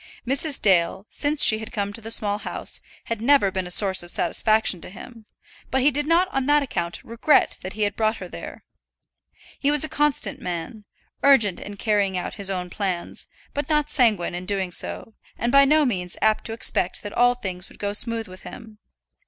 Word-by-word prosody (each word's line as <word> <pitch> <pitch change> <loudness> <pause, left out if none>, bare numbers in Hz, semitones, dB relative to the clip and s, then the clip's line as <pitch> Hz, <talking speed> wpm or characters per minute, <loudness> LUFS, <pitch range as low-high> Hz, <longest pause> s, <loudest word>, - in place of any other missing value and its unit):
Mrs. 275 +3 +1
Dale, 190 0 +2
since 295 0 +3
she 220 - +6
had 220 - -8
come 200 -1 -3
to 230 - -9
the 225 - -7
Small 210 -2 0
House, - - -3 0.2
had 230 -2 -4
never 250 -5 +4
been 190 -1 -3
a - - -8
source 190 +1 +3
of 175 - -7
satisfaction 210 +1 +1
to - - -8
him, 225 +3 -12 0.4
but 265 - +1
he 285 +3 +4
did 295 +1 -1
not 340 +3 +3
on 270 -4 -2
that 295 0 +4
account 175 -9 -4
regret 235 +6 +2
that 185 - -7
he 215 - -2
had 205 0 -1
brought 220 0 0
her - - -8
there. - - -9 1.0
He 280 - +1
was 295 0 +3
a - - -2
constant 285 -2 0
man; 180 +3 -6 0.4
urgent 225 -9 +4
in 205 0 -9
carrying 200 -3 0
out 180 - -4
his 200 -2 0
own 180 -2 -4
plans, 185 -4 -4 0.3
but 290 +1 -4
not 300 -1 +1
sanguine 220 - +2
in 180 +1 -6
doing 195 -3 -2
so, 225 - -1 0.2
and 235 +1 -1
by 275 +1 +6
no 305 +2 +3
means 180 -8 -3
apt 215 0 +1
to 225 - -4
expect 205 -5 +1
that 205 - -7
all 245 0 +3
things 185 -6 -6
would - - -17
go 205 0 -3
smooth 225 +1 0
with 185 0 -12
him. 220 -2 -12
215 Hz, 205 wpm, -23 LUFS, 190-265 Hz, 1.0 s, she